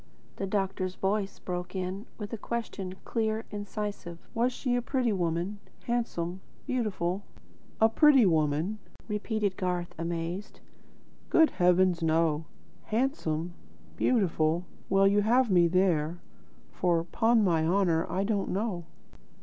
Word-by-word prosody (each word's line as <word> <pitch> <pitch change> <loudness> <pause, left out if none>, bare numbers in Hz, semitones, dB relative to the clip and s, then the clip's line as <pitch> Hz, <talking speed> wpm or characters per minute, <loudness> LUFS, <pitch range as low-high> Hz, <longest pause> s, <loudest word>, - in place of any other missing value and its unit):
The 195 - -2
doctor's 190 -2 -1
voice 195 0 -1
broke 180 0 -5
in 190 +4 -4
with 210 0 -6
a - - -2
question, 200 -6 -4
clear, 220 -1 -1
incisive. 205 -4 -5 0.2
"Was 245 +2 +2
she 250 0 -1
a 245 - +1
pretty 250 -2 0
woman; 175 +2 -1 0.2
handsome, 190 -7 -2 0.2
beautiful?" 200 -7 -1 0.6
"A 220 - +7
pretty 270 +1 +6
woman?" 160 +4 +1 0.3
repeated 210 -2 -1
Garth, 180 -2 -2
amazed: 170 +4 -4 0.7
"Good 320 -1 +5
heavens, 180 -1 +3
no! 160 -1 +2 0.4
Handsome? 180 - -1 0.4
Beautiful? 175 -7 +1 0.2
Well 195 +1 +5
you 205 +1 +4
have 235 +2 +3
me 175 -2 +5
there, 175 -2 +1 0.5
for, 170 -2 +1
'pon 225 +6 +2
my 165 -5 +2
honour, 170 -3 +2
I 185 +3 0
don't 200 -1 0
know." 190 -3 -2
190 Hz, 125 wpm, -29 LUFS, 175-215 Hz, 0.7 s, A